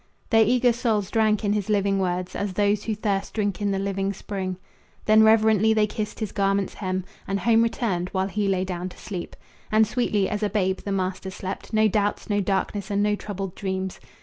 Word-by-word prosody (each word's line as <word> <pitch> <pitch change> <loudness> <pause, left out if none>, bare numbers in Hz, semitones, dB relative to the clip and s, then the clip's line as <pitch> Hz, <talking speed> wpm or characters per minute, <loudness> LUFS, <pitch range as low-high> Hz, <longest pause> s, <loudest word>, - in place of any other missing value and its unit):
Their 225 -1 +6
eager 245 +2 +3
souls 220 -5 0
drank 215 -2 +2
in 205 - +2
his 210 0 -2
living 200 -1 +2
words 180 -1 -2
As 200 -2 -2
those 205 +1 +1
who 220 - -1
thirst 200 -2 -2
drink 205 -3 -1
in 205 - +1
the 195 - 0
living 195 0 -1
spring. 190 -2 -4 0.5
Then 215 0 +6
reverently 220 0 +5
they 215 -1 +4
kissed 210 0 -5
his 215 - -2
garment's 195 -1 0
hem, 185 -2 -3 0.2
And 195 0 -1
home 230 -1 +4
returned, 200 -6 0
while 190 0 -1
he 200 +1 -1
lay 190 -1 +1
down 180 0 -4
to - - -15
sleep. 185 -4 -6 0.4
And 220 +1 +5
sweetly 215 -4 0
as 210 0 -3
a 210 - +1
babe 190 -2 0
the 200 - -5
master 190 0 -2
slept 190 0 -6
No 220 -1 +4
doubts, 205 +1 -1
no 205 0 +2
darkness, 195 +1 -1
and 205 0 +1
no 210 0 +2
troubled 195 -3 -5
dreams. 190 -2 -3
200 Hz, 205 wpm, -25 LUFS, 190-215 Hz, 0.5 s, Their